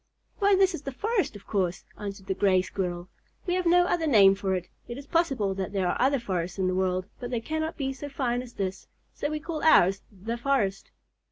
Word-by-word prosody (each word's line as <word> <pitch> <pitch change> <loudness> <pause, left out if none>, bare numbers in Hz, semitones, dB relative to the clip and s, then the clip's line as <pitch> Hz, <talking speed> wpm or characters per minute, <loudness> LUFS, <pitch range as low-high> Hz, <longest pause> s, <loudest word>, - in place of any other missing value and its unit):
Why 405 -1 +5
this 380 -1 +4
is 330 - -5
the 275 - -5
forest, 400 - -1
of 200 - -11
course," 185 -4 -1
answered 200 -1 -7
the 190 - -1
Gray 185 -1 +3
Squirrel. 180 -2 -4 0.4
"We 355 - 0
have 365 -1 0
no 355 +1 +5
other 340 -2 0
name 200 -8 +7
for 195 -1 -1
it. 180 -1 -4 0.2
It 240 - -6
is 280 - -9
possible 270 - +1
that 190 +1 -4
there 190 -2 +1
are - - 0
other 275 +2 +4
forests 185 -7 -3
in 190 - 0
the 185 - +1
world, 185 0 0
but 245 -1 -5
they 240 -2 -1
cannot 315 +6 -3
be 270 -3 -2
so 285 +2 -7
fine 250 -3 -1
as 245 -1 -11
this, 190 -1 -4 0.3
so 290 - -3
we 305 0 -2
call 315 0 -5
ours 195 - +5
'the 215 +4 -5
forest.'" 235 -7 0
235 Hz, 230 wpm, -27 LUFS, 190-300 Hz, 0.4 s, name